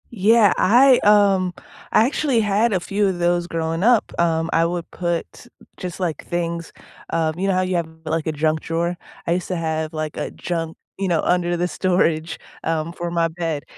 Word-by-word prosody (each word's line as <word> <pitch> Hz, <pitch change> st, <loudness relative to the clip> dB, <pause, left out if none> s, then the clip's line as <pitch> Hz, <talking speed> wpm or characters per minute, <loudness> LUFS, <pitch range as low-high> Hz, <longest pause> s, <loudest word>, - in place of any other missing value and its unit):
Yeah, 220 Hz, -1 st, +4 dB
I, 250 Hz, +5 st, +6 dB
um, 200 Hz, -3 st, +4 dB, 0.4 s
I 220 Hz, -, +5 dB
actually 270 Hz, -2 st, +1 dB
had 210 Hz, +2 st, +2 dB
a 185 Hz, -, +2 dB
few 200 Hz, +3 st, 0 dB
of 185 Hz, -2 st, -2 dB
those 175 Hz, 0 st, +1 dB
growing 165 Hz, +1 st, -2 dB
up. 235 Hz, -1 st, +3 dB
Um, 165 Hz, -1 st, +1 dB
I 165 Hz, -, +3 dB
would 170 Hz, 0 st, -3 dB
put 175 Hz, +6 st, -4 dB, 0.3 s
just, 180 Hz, -1 st, -6 dB
like, 175 Hz, -4 st, -3 dB
things, 170 Hz, -1 st, -3 dB, 0.4 s
um, 160 Hz, -1 st, 0 dB
you 190 Hz, +2 st, -1 dB
know, 195 Hz, -, +2 dB
how 185 Hz, -, +2 dB
you 185 Hz, 0 st, -1 dB
have, 170 Hz, -1 st, -2 dB, 0.2 s
like, 160 Hz, 0 st, -2 dB
a -, -, +1 dB
junk 155 Hz, +1 st, 0 dB
drawer. 170 Hz, +2 st, -2 dB, 0.3 s
I -, -, +1 dB
used 180 Hz, 0 st, -2 dB
to 185 Hz, -, -1 dB
have, 160 Hz, -2 st, -2 dB
like, 155 Hz, -1 st, -4 dB
a -, -, -3 dB
junk, 165 Hz, -2 st, -4 dB, 0.2 s
you 195 Hz, -, 0 dB
know, 170 Hz, -3 st, +1 dB
under 175 Hz, -1 st, +1 dB
the 175 Hz, +1 st, 0 dB
storage, 165 Hz, -1 st, 0 dB, 0.3 s
um, 165 Hz, 0 st, -1 dB
for 175 Hz, 0 st, -4 dB
my 170 Hz, -1 st, +1 dB
bed. 165 Hz, -3 st, -3 dB
175 Hz, 195 wpm, -21 LUFS, 165-190 Hz, 0.4 s, I